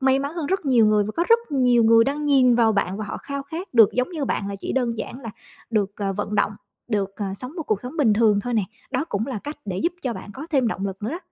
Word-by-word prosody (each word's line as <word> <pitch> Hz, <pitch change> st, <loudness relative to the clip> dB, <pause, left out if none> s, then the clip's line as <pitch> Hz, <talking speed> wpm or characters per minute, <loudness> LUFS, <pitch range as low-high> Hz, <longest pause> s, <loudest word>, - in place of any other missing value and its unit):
may 265 Hz, 0 st, +3 dB
mắn 280 Hz, +2 st, -3 dB
hơn 325 Hz, -4 st, -3 dB
rất 380 Hz, -1 st, -1 dB
nhiều 240 Hz, -5 st, +5 dB
người 210 Hz, -1 st, +3 dB
và 215 Hz, -, -4 dB
có 340 Hz, -, +2 dB
rất 460 Hz, 0 st, +7 dB
nhiều 245 Hz, -4 st, +4 dB
người 230 Hz, 0 st, +6 dB
đang 290 Hz, +3 st, -2 dB
nhìn 265 Hz, -4 st, +5 dB
vào 230 Hz, -2 st, +4 dB
bạn 195 Hz, -1 st, 0 dB
và 215 Hz, -, -4 dB
họ 200 Hz, -, -5 dB
khao 280 Hz, 0 st, -5 dB
khát 320 Hz, +2 st, -7 dB
được 225 Hz, -3 st, +7 dB
giống 250 Hz, +6 st, 0 dB
như 310 Hz, -5 st, -3 dB
bạn, 200 Hz, -5 st, -2 dB
là 200 Hz, -, -4 dB
chỉ -, -, -4 dB
đơn 240 Hz, -4 st, 0 dB
giản 255 Hz, -, -6 dB
là 230 Hz, -, -6 dB, 0.4 s
được, 205 Hz, -3 st, 0 dB
ờ, 195 Hz, -1 st, -2 dB
vận 205 Hz, +1 st, -3 dB
động, 205 Hz, 0 st, +2 dB, 0.4 s
được, 200 Hz, -3 st, -1 dB
ờ, 195 Hz, -1 st, -3 dB
sống 255 Hz, +8 st, -6 dB
một 325 Hz, -, -3 dB
cuộc 215 Hz, -8 st, 0 dB
sống 255 Hz, +7 st, -7 dB
bình 245 Hz, -8 st, +4 dB
thường 210 Hz, -2 st, +3 dB
thôi 245 Hz, +3 st, -3 dB
nè. 215 Hz, -, +2 dB, 0.3 s
Đó 270 Hz, +2 st, 0 dB
cũng 205 Hz, +3 st, -2 dB
là 255 Hz, -6 st, -3 dB
cách 295 Hz, +1 st, -5 dB
để 185 Hz, -2 st, -3 dB
giúp 340 Hz, -, +1 dB
cho 250 Hz, -3 st, -1 dB
bạn 210 Hz, -, -9 dB
có 295 Hz, +4 st, -7 dB
thêm 265 Hz, -6 st, +2 dB
động 200 Hz, -2 st, -3 dB
lực 195 Hz, +1 st, -7 dB
nữa 220 Hz, -, -2 dB
đó. 335 Hz, -, -4 dB
240 Hz, 295 wpm, -23 LUFS, 210-275 Hz, 0.4 s, rất